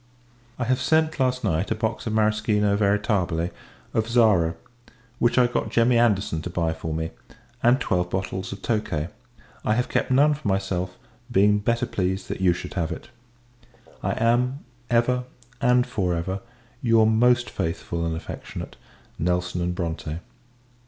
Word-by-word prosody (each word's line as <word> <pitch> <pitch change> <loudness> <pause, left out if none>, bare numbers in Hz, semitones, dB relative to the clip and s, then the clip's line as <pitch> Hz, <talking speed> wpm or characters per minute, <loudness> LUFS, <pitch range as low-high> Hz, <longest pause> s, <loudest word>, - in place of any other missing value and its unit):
I 125 - -1
have 125 +2 +1
sent, 160 -1 +2
last 130 -1 +1
night, 80 +5 0
a 110 - +1
box 110 +1 -2
of 110 - -1
Marischino 105 -1 +2
Veritabile 100 -5 +1 0.4
of 110 0 0
Zara, 105 -9 +4 0.6
which 120 +2 +2
I 125 - +6
got 120 - -1
Jemmy 120 +1 +3
Anderson 100 -8 +2
to 90 - -5
buy 85 -2 0
for 80 0 -5
me, 80 +1 -2 0.5
and 120 +3 +4
twelve 90 -8 0
bottles 95 0 -3
of 100 - -8
tokay. 85 -9 -1 0.5
I 110 - +2
have 125 +2 0
kept - - 0
none 145 +4 +5
for 145 -5 -5
myself, 95 -2 -1 0.3
being 105 +2 +4
better 115 +4 +1
pleased 95 -3 -2
that - - -4
you 90 -2 +5
should 85 - -5
have 85 -4 -1
it. - - -7 0.9
I - - 0
am, 125 +4 +1 0.2
ever, 125 +1 +2 0.4
and 125 0 +4
for 90 -5 -1
ever, 95 +4 -2 0.4
your 115 -2 +4
most 120 +2 +3
faithful 85 +1 -3
and 80 -1 -1
affectionate 80 - -7 0.4
NELSON 90 0 0
& - - -3
BRONTE. 80 -2 -3
105 Hz, 155 wpm, -24 LUFS, 90-120 Hz, 0.9 s, I